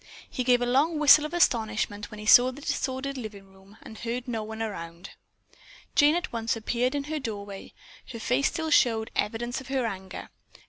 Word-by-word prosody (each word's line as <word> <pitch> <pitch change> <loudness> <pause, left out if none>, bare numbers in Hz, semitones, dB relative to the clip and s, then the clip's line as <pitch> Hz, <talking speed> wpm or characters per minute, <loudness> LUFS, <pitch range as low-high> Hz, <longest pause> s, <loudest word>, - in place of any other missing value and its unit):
He 255 - -3
gave 245 -1 +3
a - - +1
long 285 +7 +2
whistle 300 0 +7
of 305 - -6
astonishment 215 -8 0
when 215 - -10
he 210 - -8
saw 245 +3 +7
the 265 - -11
disordered 275 -1 -3
living 200 -4 -9
room 195 +2 -19
and 220 - -11
heard 245 +2 -4
no 230 -3 -2
one 220 +1 -7
about. 170 -5 -6 0.8
Jane 295 +2 +5
at 350 -6 -3
once 230 0 -1
appeared 245 +4 -1
in 285 - -1
her 305 +2 -4
doorway. 205 -6 -7 0.4
Her 230 - -7
face 250 +5 +1
still 320 -2 -3
showed 225 -5 +3
evidence 240 +4 -2
of 265 - -13
her 265 -2 -1
anger. 190 -3 -6
240 Hz, 190 wpm, -27 LUFS, 215-270 Hz, 0.8 s, whistle